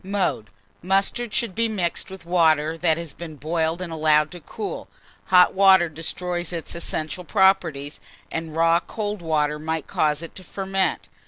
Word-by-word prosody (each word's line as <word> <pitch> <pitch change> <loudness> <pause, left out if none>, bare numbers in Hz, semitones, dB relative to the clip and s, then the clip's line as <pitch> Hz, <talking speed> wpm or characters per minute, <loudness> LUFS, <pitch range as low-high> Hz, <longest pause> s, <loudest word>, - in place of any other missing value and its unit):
Mode. 190 - -1 0.3
Mustard 195 +5 0
should 225 -2 -1
be 230 +2 +1
mixed 185 -4 -2
with 190 -3 -10
water 160 -3 +3
that 165 -1 +1
has 165 -4 -6
been 160 -1 -8
boiled 160 +3 -1
and 170 -2 -6
allowed 155 -1 +3
to 175 - -9
cool; 210 +7 -6 0.4
hot 180 -1 +6
water 190 -3 +6
destroys 175 +3 -3
its 170 -2 -4
essential 170 +1 -3
properties, 165 -7 +2 0.3
and 160 -1 -4
raw 165 +1 +4
cold 205 +1 -5
water 150 -2 0
might 160 0 -3
cause 150 +1 0
it 165 - -9
to 185 - -11
ferment. 195 0 -2
170 Hz, 160 wpm, -23 LUFS, 155-190 Hz, 0.4 s, hot